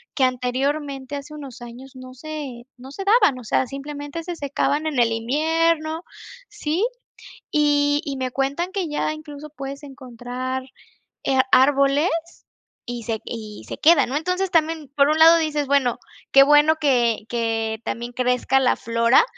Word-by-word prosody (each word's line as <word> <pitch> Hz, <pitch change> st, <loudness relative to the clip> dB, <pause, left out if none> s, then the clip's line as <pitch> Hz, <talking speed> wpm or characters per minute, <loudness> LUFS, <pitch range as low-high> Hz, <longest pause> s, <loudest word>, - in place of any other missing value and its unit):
que, 270 Hz, -, +1 dB
anteriormente, 265 Hz, +2 st, -1 dB
hace 290 Hz, +2 st, -8 dB
unos 275 Hz, -4 st, -10 dB
años 240 Hz, +3 st, -10 dB
no 255 Hz, 0 st, -11 dB
se 280 Hz, -4 st, -7 dB
no 255 Hz, +2 st, -11 dB
se 340 Hz, +8 st, -6 dB
daban, 400 Hz, -, +4 dB
o 250 Hz, -, -9 dB
sea, 255 Hz, +3 st, 0 dB
simplemente 290 Hz, +4 st, -7 dB
se 350 Hz, +1 st, -5 dB
secaban 290 Hz, +1 st, -1 dB
en 285 Hz, -5 st, -1 dB
el 235 Hz, -1 st, +3 dB
invierno 315 Hz, +7 st, 0 dB, 0.5 s
Sí. 315 Hz, +6 st, -2 dB, 0.7 s
Y 290 Hz, -1 st, +2 dB
y 280 Hz, -3 st, -4 dB
me 260 Hz, -1 st, -3 dB
cuentan 280 Hz, +8 st, -2 dB
que 375 Hz, -4 st, -2 dB
ya 300 Hz, +1 st, -1 dB
incluso 305 Hz, -1 st, -10 dB
puedes 275 Hz, 0 st, -7 dB
encontrar, 255 Hz, -1 st, -6 dB, 0.6 s
eh, 265 Hz, -, +1 dB
árboles 275 Hz, +4 st, +4 dB, 0.8 s
y 240 Hz, -1 st, -6 dB
se 220 Hz, -1 st, -3 dB
y 215 Hz, -3 st, -8 dB
se -, -, -7 dB
quedan, 315 Hz, -4 st, +5 dB
¿no? 275 Hz, -, -1 dB
Entonces, 365 Hz, +4 st, -1 dB
también, 320 Hz, -3 st, 0 dB
por 280 Hz, 0 st, +5 dB
un 310 Hz, +1 st, +2 dB
lado 325 Hz, +1 st, +8 dB
dices: 300 Hz, -3 st, -1 dB
"Bueno, 270 Hz, -4 st, +2 dB, 0.3 s
qué 275 Hz, -, +8 dB
bueno 295 Hz, +2 st, +5 dB
que 245 Hz, -8 st, +1 dB
que 225 Hz, -2 st, -1 dB
también 240 Hz, +1 st, -4 dB
crezca 250 Hz, +1 st, +1 dB
la 255 Hz, -, +2 dB
flora, 230 Hz, -, +3 dB
280 Hz, 160 wpm, -22 LUFS, 250-305 Hz, 0.8 s, lado